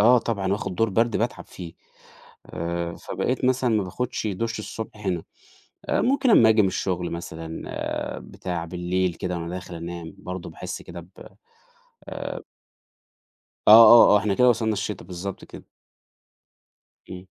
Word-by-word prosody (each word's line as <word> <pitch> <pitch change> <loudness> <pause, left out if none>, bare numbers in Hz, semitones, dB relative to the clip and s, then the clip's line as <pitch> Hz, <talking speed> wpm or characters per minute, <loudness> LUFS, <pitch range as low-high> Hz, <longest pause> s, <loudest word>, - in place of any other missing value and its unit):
آه 120 +4 +6
طبعًا 100 -5 -2
وآخُد 100 -2 -3
دور 115 +4 +2
برد 115 +3 +1
باتعب - - -2
فيه، 85 -2 -10 0.7
آآ 85 0 -4
فبقيت 130 0 -3
مثلًا 130 -1 +2
ما 105 -3 +1
باخدش 125 +5 -3
دُش 115 +4 -3
الصبح 105 -1 -7
هنا، 90 -3 -1 0.7
آآ - - +2
ممكن 265 0 +2
أمّا 115 - +7
آجي 110 -1 +5
من 95 - +2
الشُغل 90 -1 -2
مثلًا 80 -1 -7 0.6
بتاع، 85 -2 -5
بالليل 90 +1 -1
كده 90 +1 -4
وأنا 85 0 -5
داخل 90 -1 -7
أنام 85 +1 -7
برضه 90 -2 -7
باحس - - -7
كده 85 0 -9
ب 85 - -16 1.0
آآ - - -5 1.3
آه، 115 +1 +9
آه، - - +7
إحنا 100 0 0
كده 125 +5 +5
وصلنا 110 -2 +1
الشِتا 105 -3 -4
بالضبط 90 +2 -7
كده. - - -12 1.4
إمم. 90 0 -9
95 Hz, 145 wpm, -24 LUFS, 85-115 Hz, 1.4 s, آه